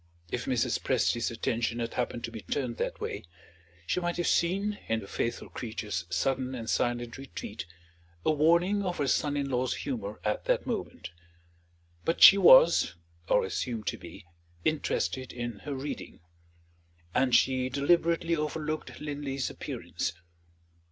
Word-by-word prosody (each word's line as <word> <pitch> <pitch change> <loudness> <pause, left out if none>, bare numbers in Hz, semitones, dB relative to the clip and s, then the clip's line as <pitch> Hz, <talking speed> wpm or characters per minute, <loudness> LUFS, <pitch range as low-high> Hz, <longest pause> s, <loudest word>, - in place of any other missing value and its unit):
If - - -2
Mrs. - - +1
Presty's 120 0 +1
attention 115 0 -1
had 115 -1 -3
happened 120 -1 -2
to 115 - -4
be 110 -2 -7
turned 125 -5 -3
that - - -2
way, - - -4 0.6
she - - 0
might 175 -1 -2
have 175 - 0
seen, 200 +4 +1
in 115 0 +1
the 100 - -8
faithful 115 - -3
creature's 105 -6 -4
sudden 130 +6 0
and 115 -2 -6
silent 120 +1 -1
retreat, 115 -8 -7 0.6
a - - +4
warning 170 +6 +3
of 180 -3 -2
her 145 - 0
son 145 +2 +1
in 140 -1 -1
law's 125 0 0
humor 110 -7 -4
at 105 0 -1
that - - +1
moment. - - -4 0.9
But 165 - 0
she 200 - +10
was, 165 - +7 0.3
or - - +4
assumed 115 -4 -3
to - - -5
be, 90 +2 -11 0.4
interested 135 -4 -1
in 120 -3 -5
her 145 -2 -3
reading; 135 - -6 0.9
and 125 -1 +3
she 130 -1 +3
deliberately 165 +4 +2
overlooked 155 0 -3
Linley's 145 -2 -3
appearance. - - -4
130 Hz, 145 wpm, -29 LUFS, 115-155 Hz, 0.9 s, she